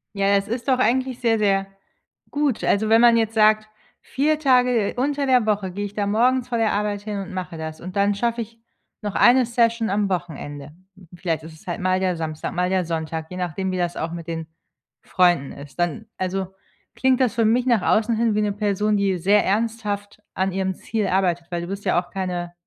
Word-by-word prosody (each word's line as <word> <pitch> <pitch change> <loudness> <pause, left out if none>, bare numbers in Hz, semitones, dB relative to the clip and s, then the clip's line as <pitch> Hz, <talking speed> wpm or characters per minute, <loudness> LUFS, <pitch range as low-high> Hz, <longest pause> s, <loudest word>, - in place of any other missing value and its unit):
Ja, 200 0 +3
das 200 0 0
ist 235 +2 -4
doch 260 -2 +3
eigentlich 255 +1 +1
sehr, 230 -2 +2
sehr 195 -2 +1 0.6
gut. 290 -5 0
Also, 215 +2 +2
wenn 225 +1 +6
man 240 -1 +7
jetzt 225 -1 0
sagt: 215 0 +3 0.3
„4 300 +3 0
Tage 250 -6 +3
unter 280 +2 0
der 250 -4 +3
Woche 205 -3 0
gehe 205 +3 -4
ich 200 - -7
dann 205 -1 -1
morgens 250 +3 +2
vor 240 - -1
der 225 -1 +1
Arbeit 205 0 -1
hin 205 -1 -4
und 190 -1 -7
mache 180 -3 -5
das. 160 0 -6
Und 185 +1 -8
dann 200 0 +3
schaffe 235 +3 -1
ich 230 +1 -9 0.4
noch 205 -2 -4
1 250 +1 +5
Session 230 -1 +1
am 200 +1 0
Wochenende. 150 -5 -5 0.4
Vielleicht 165 -3 -2
ist 160 0 -10
es 155 - -18
halt 175 - -4
mal 185 0 +1
der 185 -2 0
Samstag, 155 -1 -4
mal 180 0 0
der 185 -1 +1
Sonntag, 160 -1 -4
je 180 - -6
nachdem, 185 +1 -2
wie 185 - -2
das 175 -1 -1
auch 165 - -3
mit 170 -1 -7
den 165 -1 -4 0.6
Freunden 175 -7 +2
ist.“ 145 +3 -12
Dann 175 +6 -1
also 190 0 -2 0.5
klingt 260 0 +2
das 250 -3 +2
für 230 - +2
mich 240 +3 +2
nach 235 -5 +3
außen 225 +1 +2
hin 230 -2 +1
wie 215 - +2
'ne 210 -1 +1
Person, 210 0 0
die 195 -2 +1
sehr 200 +4 +3
ernsthaft 210 -1 -2
an 190 +1 0
ihrem 190 0 -1
Ziel 215 +1 -2
arbeitet, 180 -3 0
weil 175 -1 -2
du 170 - -6
bist 195 +2 -6
ja - - +3
auch 175 - -22
keine 180 -2 -3
200 Hz, 215 wpm, -22 LUFS, 180-230 Hz, 0.6 s, man